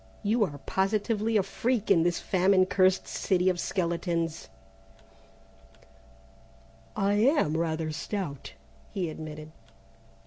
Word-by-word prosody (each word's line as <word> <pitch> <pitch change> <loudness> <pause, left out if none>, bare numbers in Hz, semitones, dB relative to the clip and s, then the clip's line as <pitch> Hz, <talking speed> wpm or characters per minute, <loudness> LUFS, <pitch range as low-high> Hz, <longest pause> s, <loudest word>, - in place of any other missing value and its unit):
You 215 +2 +2
are 145 -6 -7
positively 215 +3 0
a 200 - +2
freak 225 +3 -1
in 165 - +5
this 175 +1 +1
famine 185 0 +3
cursed 185 0 +2
city 185 -1 +1
of 180 -1 -1
skeletons!" 170 -3 -2 2.5
"I 200 +1 +1
am 215 - +3
rather 160 -1 -1
stout," 155 -3 -5 0.4
he 180 -6 -3
admitted. 155 0 -8
185 Hz, 105 wpm, -28 LUFS, 165-205 Hz, 2.5 s, in